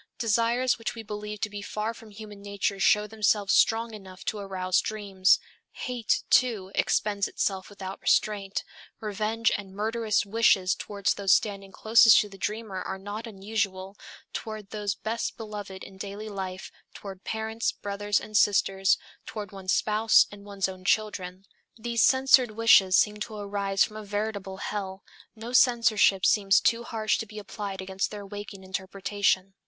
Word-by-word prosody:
Desires 235 +2 +1
which 230 - -4
we 225 - -7
believe 210 0 -6
to 220 - -1
be 205 -1 -6
far 215 +2 -3
from 225 -1 -14
human 210 -1 -11
nature 200 -1 -2
show 210 +2 +4
themselves 210 -2 +1
strong 230 0 +3
enough 190 -3 -11
to 215 - -2
arouse 185 -2 0
dreams. 200 -3 +2 0.4
Hate, 245 -3 -1
too, 220 -7 +3
expends 205 -2 +1
itself 190 -2 -2
without 195 -1 -8
restraint. 200 -2 +1 0.4
Revenge 215 +1 0
and 195 -2 -7
murderous 220 0 0
wishes 200 -3 +3
toward 200 -2 -8
those 200 -2 +3
standing 195 -2 0
closest 225 +2 +6
to 210 - -6
the 195 -1 -13
dreamer 210 -2 -3
are - - -4
not 205 +4 -6
unusual, 195 -2 -3 0.4
toward 215 -2 -6
those 205 -2 -2
best 225 +4 -3
beloved 205 -4 -7
in 190 - -12
daily 205 +2 -6
life, 190 -2 -6 0.2
toward 195 -2 -9
parents, 220 +1 -2
brothers 205 0 -1
and 215 - -10
sisters, 195 -2 +3 0.3
toward 210 -3 -6
one's 190 -1 -4
spouse 215 +1 +4
and 205 -1 -12
one's 200 -2 -2
own 185 -1 -9
children. 190 -2 -1 0.3
These 235 0 -1
censored 260 -1 +5
wishes 210 -4 +5
seem 210 0 +2
to 215 +1 -6
arise 200 -1 0
from 215 - -4
a 215 - -7
veritable 205 -2 -4
hell; 195 -1 -5 0.3
no 230 +2 -8
censorship 230 -6 +4
seems 200 -2 +4
too 230 0 +2
harsh 220 -2 0
to 225 - -4
be 215 0 -11
applied 200 -1 -6
against 190 +1 -2
their 205 -1 -8
waking 205 -1 -8
interpretation. 190 0 -1
205 Hz, 160 wpm, -27 LUFS, 195-220 Hz, 0.4 s, closest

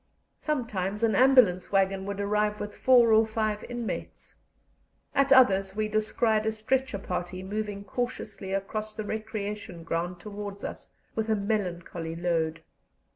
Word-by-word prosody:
Sometimes 215 - -2
an 225 -1 +3
ambulance 240 -7 +5
waggon 195 0 +1
would 200 0 -4
arrive 210 +1 +1
with 210 0 -5
four 240 -3 +5
or 220 +1 +6
five 215 -1 -1
inmates; 240 -2 -5 0.8
at 275 0 +2
others 195 -7 +5
we 215 0 0
descried 215 +1 +1
a - - +3
stretcher 255 +2 -1
party 185 -1 -4
moving 205 0 -4
cautiously 215 -3 -4
across 215 +2 -3
the 215 - -3
recreation 210 -4 -5
ground 170 +2 -2
towards 205 0 -7
us - - -7 0.2
with 220 0 -2
a 220 - +3
melancholy 180 -5 -2
load. 165 -2 -1
210 Hz, 135 wpm, -28 LUFS, 190-220 Hz, 0.8 s, or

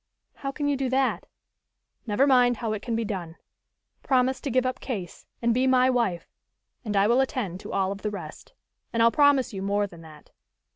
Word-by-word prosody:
"How 275 -1 -4
can 290 +1 -3
you 285 - +2
do 270 -1 -1
that?" 265 0 0 0.8
"Never 220 +6 +3
mind 250 -3 +4
how 225 -3 -2
it 210 - -4
can 235 -1 -3
be 230 0 -1
done. 180 -6 -5 0.7
Promise 260 0 +1
to 285 - -3
give 255 0 +1
up 255 - -2
Case, 195 - -6 0.2
and 235 0 +3
be 255 +2 +2
my 260 0 +4
wife, 220 -9 -1 0.6
and 210 -3 -2
I 195 - +4
will 240 +5 +4
attend 235 - -3
to - - -9
all 190 0 0
of 200 0 -6
the 210 - -1
rest. 205 - -9 0.4
And 230 0 +2
I'll 230 - +5
promise 285 -4 +3
you 190 - -5
more 200 +1 0
than 170 -4 -12
that. 155 -2 -15
235 Hz, 205 wpm, -26 LUFS, 200-260 Hz, 0.8 s, I'll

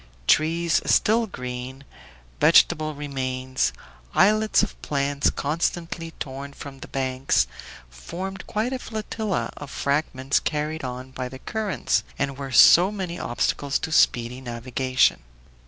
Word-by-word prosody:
Trees 165 - +3
still 225 +2 +3
green, 125 -3 -7 0.6
vegetable 155 -1 +4
remains, 130 -2 -2 0.4
islets 215 +3 +4
of 210 - -5
plants 140 0 0
constantly 165 +2 -2
torn 140 +1 -6
from 140 -1 -10
the - - -9
banks, 130 0 +1 0.4
formed 180 - -7
quite 220 +5 -1
a 260 - -3
flotilla 215 -3 -3
of 145 - -8
fragments 140 -2 0
carried 155 0 -2
on 130 0 -6
by 130 -1 -5
the 130 - -9
currents, 215 +7 -1
and 140 -1 -1
were 135 -1 -6
so 175 +8 +7
many 185 -4 -5
obstacles 135 +3 -1
to 160 - -5
speedy 125 -4 +2
navigation. 125 - 0
140 Hz, 120 wpm, -24 LUFS, 130-175 Hz, 0.6 s, so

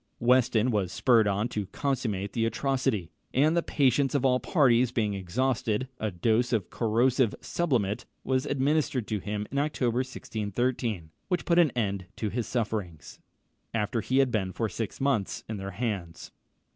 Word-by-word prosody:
Weston 125 -1 +3
was 100 -5 0
spurred 115 +4 +4
on 100 +3 +1
to 105 -4 -3
consummate 105 -7 -2
the 115 - 0
atrocity; 125 - -1 0.2
and 150 +5 +4
the 170 - +3
patience 140 -2 +2
of 135 -1 +1
all 125 -1 +4
parties 125 -7 +3
being 105 -4 0
exhausted, 110 +4 -1
a 110 - -1
dose 110 +6 +1
of 110 -7 -1
corrosive 120 +1 +2
sublimate 120 - -1 0.2
was 130 0 0
administered 140 -3 +1
to 105 - -1
him 105 +1 -3
in 140 - 0
October 130 -5 0
1613, 115 -6 -2 0.2
which 180 -2 -1
put 170 0 +4
an 170 -3 +6
end 100 -5 -1
to 110 - -2
his 115 +2 -3
sufferings, 105 - -3 0.6
after 110 +1 0
he 130 - 0
had 135 -2 +4
been 95 -5 0
for 115 +4 -1
six 110 0 -5
months 135 -8 0
in 110 - -4
their 95 0 -5
hands. 100 -5 -4
115 Hz, 160 wpm, -28 LUFS, 105-130 Hz, 0.6 s, an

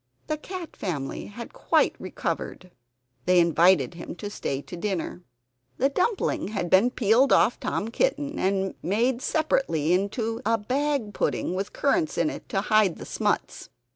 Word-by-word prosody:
The 310 - -2
cat 360 +1 -7
family 145 -9 -4
had 230 +3 -9
quite - - +2
recovered. 185 0 -4 0.6
They 180 0 +5
invited 170 +2 +4
him 170 0 -8
to 205 +4 -6
stay 140 -7 -3
to - - -9
dinner. 180 -1 -3 0.6
The 270 - +3
dumpling 370 - 0
had 195 -5 -3
been 195 +6 +6
peeled 245 +3 +3
off 240 - +4
Tom 215 - -2
Kitten 295 - -1
and 190 0 0
made 235 +7 +1
separately 220 - +1
into 220 +5 -1
a 230 -1 +2
bag 255 0 -1
pudding, 180 - -1
with 195 +2 -3
currants 315 +3 0
in 310 - +2
it - - -9
to 195 -5 0
hide 210 -4 +3
the - - -8
smuts. - - -2
210 Hz, 155 wpm, -26 LUFS, 185-270 Hz, 0.6 s, been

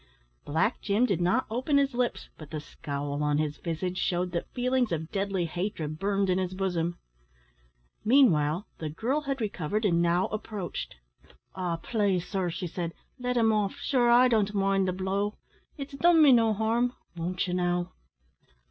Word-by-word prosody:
Black 165 - 0
Jim 215 +4 +2
did 195 -7 0
not 185 +9 +2
open 255 +5 +1
his 275 -1 +2
lips, 245 0 -1
but 155 -3 -11
the 155 - -4
scowl 145 0 -5
on 150 0 +1
his 150 -1 -1
visage 180 +2 -3
shewed 180 0 0
that 170 - -4
feelings 250 -2 +1
of 160 -1 -3
deadly 195 -3 -1
hatred 165 -3 -4
burned 200 0 +1
in 185 0 +2
his 185 0 -2
bosom. 175 -3 -1 1.1
Meanwhile, 195 - +4
the 155 - -3
girl 240 - -1
had 275 -2 -3
recovered, 210 -1 -2
and 170 -4 +3
now 175 +1 +2
approached. 210 -4 -5 0.6
"Ah! 180 -3 -2
plase, 195 -3 0
sir," 190 -3 -1
she 180 +2 -4
said, 170 -1 -4 0.2
"let 250 0 -1
him 225 -2 +4
off. 205 -2 0
Shure 245 -3 +1
I 245 +2 +7
don't 210 -4 +1
mind 195 -1 +2
the - - +1
blow; 195 +3 -2 0.4
it's 280 0 -7
done 335 +4 +4
me 300 -3 +8
no 230 -3 +5
harm 225 +3 +1 0.2
won't 175 +3 -2
ye, 180 - -2
now?" 175 -1 0
195 Hz, 170 wpm, -28 LUFS, 175-230 Hz, 1.1 s, me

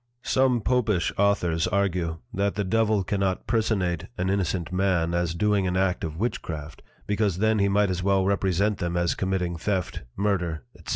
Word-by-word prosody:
Some 130 -3 +2
Popish 105 -8 +1
Authors 90 -5 +2
argue, 90 -4 0 0.2
That 100 +1 0
the 105 - 0
Devil 110 +1 +2
cannot 95 0 -1
personate 95 -6 0
an 95 +1 0
innocent 90 -2 -1
Man 90 -3 +1
as 85 -1 0
doing 100 0 +2
an 90 +1 0
act 95 -1 +1
of 80 -1 -4
Witchcraft, 80 -8 -4 0.2
because 105 -3 0
then 110 +2 +2
he 100 0 +3
might 100 0 +2
as 90 -1 -2
well 95 0 +2
represent 100 +1 +1
them 85 0 -1
as 85 -1 +1
committing 90 -2 -1
Theft, 95 +1 -2 0.2
Murder, 90 -7 -1
_&c. - - -18
95 Hz, 170 wpm, -26 LUFS, 85-100 Hz, 0.2 s, he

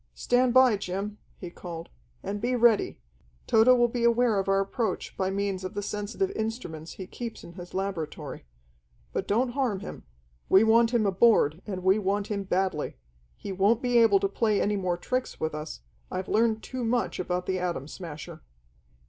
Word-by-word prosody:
"Stand 245 0 +2
by, 255 -3 +6
Jim!" 200 +3 -4 0.2
he 175 -2 -8
called. 170 -2 -8 0.3
"And 205 +1 -4
be 250 +2 0
ready. 235 -3 +3 0.5
Tode 225 +1 +4
will 245 -1 +6
be 235 0 -3
aware 235 -2 +3
of 195 0 -2
our 195 0 +3
approach 195 +1 -2
by 190 0 -1
means 195 -1 -2
of 185 - -6
the 205 - -2
sensitive 210 - -2
instruments 215 - -5
he 190 - -7
keeps 235 +4 -7
in 170 - -11
his 175 0 -10
laboratory. 160 - -4 0.7
But - - -2
don't 240 +5 +2
harm 240 -7 -1
him. - - -8 0.5
We 190 - +7
want 230 +1 +5
him 235 -3 +2
aboard, 195 -5 +3
and 185 -3 -4
we 190 +3 +4
want 200 +1 -1
him 200 -1 -2
badly. 185 -5 -1 0.4
He 200 - -6
won't 205 +6 +2
be 245 -1 +4
able 220 -4 +5
to 200 - +2
play 210 +1 +1
any 210 +1 +1
more 185 -3 -1
tricks 255 +8 -3
with 160 -1 -2
us. 150 - -6 0.3
I've 185 0 -4
learned 220 0 +2
too 255 -1 -5
much 235 +1 0
about 180 0 -2
the 185 -1 -1
Atom 175 -6 -3
Smasher." 160 -3 -8
200 Hz, 180 wpm, -27 LUFS, 185-230 Hz, 0.7 s, We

